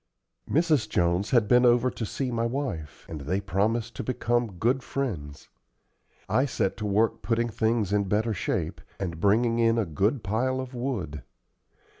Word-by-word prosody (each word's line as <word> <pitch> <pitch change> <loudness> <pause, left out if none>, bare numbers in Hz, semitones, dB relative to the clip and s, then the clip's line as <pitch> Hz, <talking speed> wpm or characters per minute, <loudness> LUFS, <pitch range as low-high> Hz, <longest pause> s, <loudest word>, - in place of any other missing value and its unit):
Mrs. 150 - +2
Jones 85 +3 +1
had 120 -5 +3
been 125 +3 +5
over 125 +1 +4
to 110 - -4
see 130 +3 -3
my 115 0 0
wife, 115 - -4
and 80 -3 -6
they 90 +8 -1
promised 110 +4 -1
to - - -3
become 120 -3 0
good 125 +8 +1
friends. 85 - -4 0.8
I 130 - +2
set 110 -6 -1
to 105 - -3
work 105 +3 +1
putting 115 0 0
things 110 -2 0
in 100 -1 +2
better 110 +3 +1
shape, 85 - -2 0.2
and 85 -4 -4
bringing 115 +3 +3
in 115 0 +3
a 115 - +1
good 100 - 0
pile 125 +7 0
of 130 0 -6
wood. 110 - -3
115 Hz, 165 wpm, -27 LUFS, 100-125 Hz, 0.8 s, been